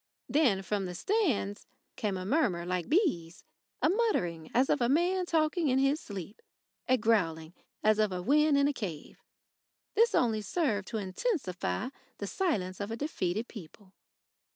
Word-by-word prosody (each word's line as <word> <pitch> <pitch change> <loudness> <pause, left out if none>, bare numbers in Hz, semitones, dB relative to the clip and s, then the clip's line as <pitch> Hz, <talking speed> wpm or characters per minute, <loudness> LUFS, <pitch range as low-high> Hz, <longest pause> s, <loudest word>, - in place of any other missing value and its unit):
Then 245 -11 +2
from 200 0 -1
the 180 -1 -5
stands 270 - 0 0.3
came 205 -3 -2
a 185 - -5
murmur 195 - +1
like 180 -1 -2
bees, 275 - +1 0.4
a - - +6
muttering 180 - 0
as 255 +3 +3
of - - +1
a 240 - +2
man 355 +5 +2
talking 320 0 +1
in 255 - +3
his 275 +3 +2
sleep, 200 - -8 0.5
a 255 - +4
growling 170 -8 +1 0.3
as 215 0 +4
of 215 -1 +3 0.2
wind 300 +2 +4
in 280 0 +4
a 290 - 0
cave. 180 - -7 0.7
This 460 +2 +4
only 225 -3 +2
served 210 - -1
to 225 - -3
intensify 190 - -2 0.3
the - - -4
silence 190 - -1
of 200 +1 -3
a 225 - -4
defeated 220 - -2
people. 190 -1 -12
220 Hz, 155 wpm, -30 LUFS, 185-305 Hz, 0.7 s, a